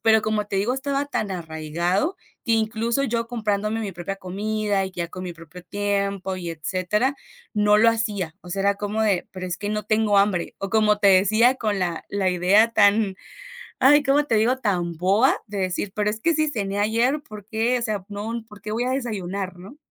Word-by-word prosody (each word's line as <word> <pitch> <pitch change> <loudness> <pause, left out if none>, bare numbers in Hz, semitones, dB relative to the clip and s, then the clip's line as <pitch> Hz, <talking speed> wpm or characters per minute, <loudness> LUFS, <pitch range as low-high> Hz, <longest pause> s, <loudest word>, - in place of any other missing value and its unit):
Pero, 220 0 +5
como 215 -1 -1
te 200 - -3
digo, 215 +6 +1
estaba 280 +1 -2
tan 215 -7 -2
arraigado, 170 - -2 0.3
que 230 - +1
incluso 225 +4 +1
yo 230 -2 -1
comprándome 215 -2 -1
mi 210 -3 -3
propia 175 +3 -5
comida 200 +1 -1
y 190 - -5
ya 170 -1 -4
con 185 +2 -7
mi 180 - -5
propio 170 +2 -13
tiempo 200 -1 -2
y 175 -2 -5
etcétera, 185 - -1 0.4
no 210 0 +4
lo 230 - +6
hacía. 210 -7 -1
O 180 - -11
sea, 195 - -2
era 200 +1 +3
como 205 +2 -3
de: 200 -5 +1
"Pero 185 -1 -6
es 175 -1 -3
que 205 +1 -4
no 210 0 -2
tengo 215 -2 +2
hambre", 195 -4 +1
o 195 - -4
como 210 0 +3
te 200 - +4
decía, 215 +7 +5
con 215 -5 -1
la 175 -3 -2
la 200 -2 0
idea 185 +6 +4
tan, 205 -1 +4 0.7
ay 290 +2 +6
¿cómo 280 +1 +3
te 235 - +1
digo?, 230 +4 +3
tan 185 -8 -1
boba 195 +9 +4
de 200 -1 -5
decir: 185 +1 -2
"Pero 210 0 +1
es 215 - -4
que 335 +8 +2
si 310 0 +1
cené 200 -6 -2
ayer 235 +7 +1
por 210 -6 -11
qué, 225 +3 +1
o - - -7
sea, 215 -4 -2
no, 220 +3 -4
por 210 -1 -14
qué 210 - -6
voy 235 - 0
a 250 - -1
desayunar", 200 -7 -3
¿no? 195 +11 -12
210 Hz, 210 wpm, -23 LUFS, 190-225 Hz, 0.7 s, lo